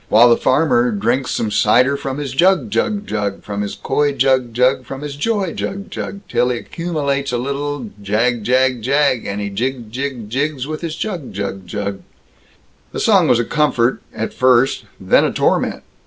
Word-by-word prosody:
While 120 +3 +7
the - - +7
farmer 130 -3 +2
drinks 120 +6 0
some 110 - -1
cider 125 +7 +3
from 135 -1 -4
his 145 -3 -4
jug, 175 - +2
jug, 205 - 0
jug, 105 -2 -3
From 100 -1 -4
his 100 - -4
coy 145 +1 0
jug, 130 -2 +2
jug; 130 +3 +2
from 135 +2 -8
his 145 -1 -5
joy 195 +3 -1
jug, 200 +1 -5
jug. 200 - -5
Till 125 - +1
he 125 - -1
accumulates 140 -3 -2
a 120 - 0
little 140 -1 -3
jag, 110 +3 0
jag, 130 +1 +2
jag, 135 0 +2
And 100 +1 -3
he 100 0 -3
jigs, 120 +1 -3
jigs, 130 -3 -4
jigs, 135 +3 -2
with 155 +1 -5
his 165 -2 -4
jug, 175 -7 -4
jug, 95 -2 -5
jug 100 0 -4 0.9
The - - -3
song - - +4
was 120 - +4
a 120 - 0
comfort, 130 -5 +1
at 110 0 -4
first 130 0 +3
then - - +3
a - - +1
torment. - - 0
130 Hz, 185 wpm, -18 LUFS, 115-145 Hz, 0.9 s, While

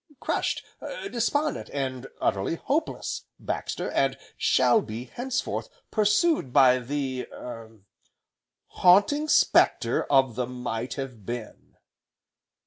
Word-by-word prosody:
"Crushed, - - -1 0.5
despondent, 285 +6 0
and 130 -2 -3
utterly 95 +11 0
hopeless, 300 - -2
Baxter, - - -3
and - - +1 0.2
shall 225 - +4
be, 115 - -6
henceforth, 245 - -3 0.2
pursued 210 - +2
by 130 0 +6
the 130 0 -3
er 115 -3 -9 0.8
Haunting 205 +12 +4
Spectre - - +3
of 135 -3 +3
the 125 +1 -2
Might 125 -1 -4
Have 125 -6 -6
Been." 120 +1 -7
130 Hz, 100 wpm, -26 LUFS, -, 0.8 s, by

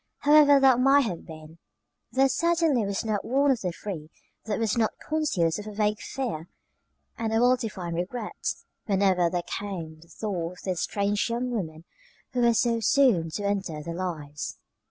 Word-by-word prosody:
However 290 -1 +7
that 265 -2 +5
might 275 +2 +5
have 180 -7 -5
been, 160 0 -11 0.5
there 265 +3 +4
certainly 325 -5 +2
was 200 +2 -2
not 210 -2 -1
one 275 +3 +2
of 245 -4 0
the 180 - -1
three 170 -4 -7 0.4
that 215 -2 -1
was 225 -4 0
not 225 -2 0
conscious 250 - 0
of 210 - -8
a - - -5
vague 210 0 +1
fear 235 - -4 0.7
and 225 -1 -1
a 225 - +2
well 250 +1 +5
defined 190 -8 -5
regret, 210 +6 -3 0.3
whenever 190 -4 +3
there 175 0 -2
came 170 -7 -6
the 165 - -18
thought 175 -2 -4
of 180 - -15
this 185 -3 -2
strange 205 +2 0
young 245 +2 -2
woman 165 -8 -4 0.5
who 250 - -1
was 235 -2 +4
so 235 -1 +1
soon 225 -8 +3
to 205 +6 -4
enter 190 -7 -2
their 170 - -5
lives. 160 -5 -5
205 Hz, 175 wpm, -26 LUFS, 175-245 Hz, 0.7 s, However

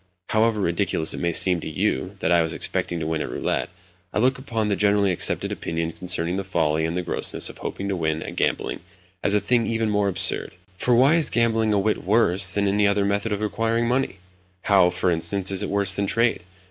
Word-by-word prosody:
However 110 -1 +1
ridiculous 85 -2 0
it - - -5
may 85 -1 0
seem 90 +1 +3
to 80 - -6
you 70 -3 -2
that - - 0
I 85 -1 +4
was 80 0 -2
expecting 85 +1 -1
to 80 - -4
win 80 -1 -2
at - - -4
roulette, - - -2 0.4
I - - -4
look 130 +4 +2
upon 115 -5 -2
the 100 - 0
generally 100 -1 +2
accepted 90 - +1
opinion 80 0 -3
concerning 90 0 0
the 100 - -2
folly 80 -4 0
and 85 +2 -3
the 90 - -2
grossness - - -1
of - - -18
hoping 100 - -5
to 100 - -1
win 80 -2 -2
at - - -8
gambling - - -1 0.4
as 105 - +2
a - - +4
thing 120 0 +1
even 115 -1 -1
more 105 -1 +1
absurd. 95 0 +1 0.2
For 120 +6 +1
why 135 +7 +5
is 160 - +2
gambling 115 -2 +1
a 105 - +2
whit 105 +2 0
worse 100 -2 +3
than 100 0 0
any 100 +1 +2
other 100 0 +1
method 100 +2 -1
of 105 +1 -2
acquiring 115 +2 -1
money? 125 -5 -1 0.5
How, 95 -3 +4
for 90 0 -1
instance, 90 +4 0
is 95 - 0
it - - -3
worse 100 -1 +2
than 100 0 -1
trade? 115 -1 +1
100 Hz, 225 wpm, -23 LUFS, 90-110 Hz, 0.5 s, why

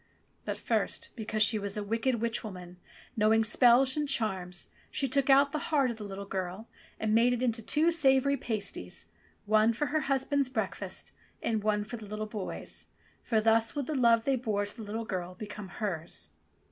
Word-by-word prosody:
'* - - -40
But - - -3
first, - - -1
because 215 -2 +1
she 215 0 +4
was 200 0 -2
a 210 - -2
wicked 230 +5 0
witch 230 0 -1
woman, 180 -4 -9 0.4
know 215 0 +3
ing 225 0 +4
spells 245 +4 +5
and 300 -2 -1
charms, 185 -7 -1 0.2
she 275 - -1
took 275 +1 +2
out 280 +1 +6
the 305 - -2
heart 280 -6 +3
of 230 - -8
the 215 - -7
little 200 0 -6
girl 190 +2 -4 0.3
and 215 -1 0
made 235 +2 +4
it 245 +1 -2
into 230 -2 0
two 310 +9 +2
savoury 280 -3 +4
pasties, 200 - -4 0.4
one 215 +2 +4
for 265 +6 -1
her 310 - +3
hus 270 -1 +2
band's 280 -2 +1
breakfast 260 - -4 0.3
and 220 -2 0
one 210 -1 +1
for 235 +3 -7
the 215 -2 -10
little 215 +1 -4
boy's, 210 -3 -6 0.3
for 225 - +1
thus 225 +1 +3
would 285 -2 -2
the 310 - -3
love 235 -4 +4
they 275 - +2
bore 215 -5 -1
to 205 - -5
the 235 - -9
little 220 +2 -4
girl 180 -3 -4
become 210 0 -7
hers. 175 -4 -4
225 Hz, 200 wpm, -30 LUFS, 205-255 Hz, 0.4 s, out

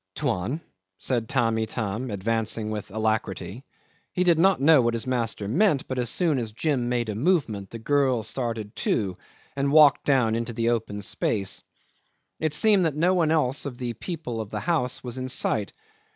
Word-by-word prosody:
'"Tuan?" 100 - -1 0.4
said 120 -4 -2
Tamb' 115 -4 +1
Itam, 110 +2 -3
advancing 110 +1 -1
with 105 -1 -5
alacrity. 110 0 -2 0.5
He 180 - +1
did 170 -3 +4
not 190 +2 +4
know 145 0 +6
what 120 -1 +1
his 115 - -3
master 115 -5 -1
meant, 150 - +2
but 130 -1 -3
as 120 -2 0
soon 160 -1 +1
as 115 -3 -4
Jim 125 0 -1
made 120 -2 0
a 105 - -2
movement 115 - 0
the 115 - -7
girl 130 -1 +1
started 115 -2 -4
too 95 -5 0 0.4
and 140 0 0
walked 150 -2 +6
down 130 -6 +3
into 115 +1 -2
the 115 +1 0
open 105 -3 -2
space. 100 0 -1 0.8
It 155 -2 -1
seems 205 +4 +4
that 155 -3 0
no 175 +4 +3
one 170 -4 +2
else 145 -4 +1
of 125 -3 -7
the 120 -2 -3
people 125 - -5
of 105 - -7
the - - -4
house 155 -8 -1
was 125 0 -5
in 130 0 -4
sight. 110 -5 -1
120 Hz, 180 wpm, -25 LUFS, 110-145 Hz, 0.8 s, know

